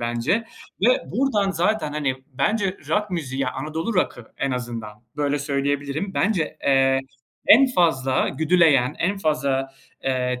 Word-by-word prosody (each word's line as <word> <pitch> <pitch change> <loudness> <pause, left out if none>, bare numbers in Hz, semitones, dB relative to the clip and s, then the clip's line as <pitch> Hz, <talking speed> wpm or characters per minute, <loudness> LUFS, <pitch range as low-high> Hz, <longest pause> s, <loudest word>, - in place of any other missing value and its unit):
bence 120 - 0 0.4
ve 245 +5 +3
buradan 225 -7 +1
zaten, 175 -2 0
hani, 140 -4 -1
bence 190 - 0
rock 210 -1 0
müziği 135 -6 -3
ya, 130 -1 -1
Anadolu 160 +10 -3
rock'ı 125 - -1
en 140 - -1
azından, 115 -3 -5
böyle, 145 0 0
söyleyebilirim. 145 +5 -2
Bence, 185 -7 0
eee, 135 -1 +3 0.5
en 275 - +8
fazla 145 - +1
güdüleyen, 155 -4 +3
en 195 +4 0
fazla, 140 -5 0 0.3
eee, 125 -1 -1
145 Hz, 135 wpm, -23 LUFS, 130-185 Hz, 0.5 s, en